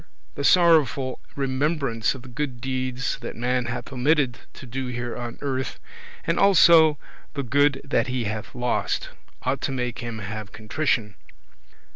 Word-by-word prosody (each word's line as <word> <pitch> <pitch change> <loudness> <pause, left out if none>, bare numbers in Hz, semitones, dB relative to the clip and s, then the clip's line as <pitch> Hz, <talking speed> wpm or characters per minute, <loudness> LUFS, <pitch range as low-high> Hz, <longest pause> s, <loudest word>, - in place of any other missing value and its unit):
The 140 - -4
sorrowful 150 -6 +4 0.2
remembrance 135 -3 0
of 130 - -10
the - - -12
good 130 -1 -4
deeds 130 0 -2
that - - -6
man 125 +1 0
hath 120 +3 -5
omitted 135 -1 +2 0.2
to - - -10
do 130 +2 -4
here 120 -1 -4
on 120 -1 -6
earth, 130 -2 -3 0.5
and 165 - +1
also 165 -6 +7 0.4
the 140 - -1
good 140 +2 +3
that 140 -2 +1
he 125 -1 -1
hath 110 0 -5
lost, 125 0 -1 0.3
ought 130 +1 -1
to - - -1
make 125 -2 -3
him 120 -1 -5
have 105 0 -6
contrition; 110 0 -1 0.6
5. - - -30
130 Hz, 155 wpm, -24 LUFS, 120-140 Hz, 0.6 s, also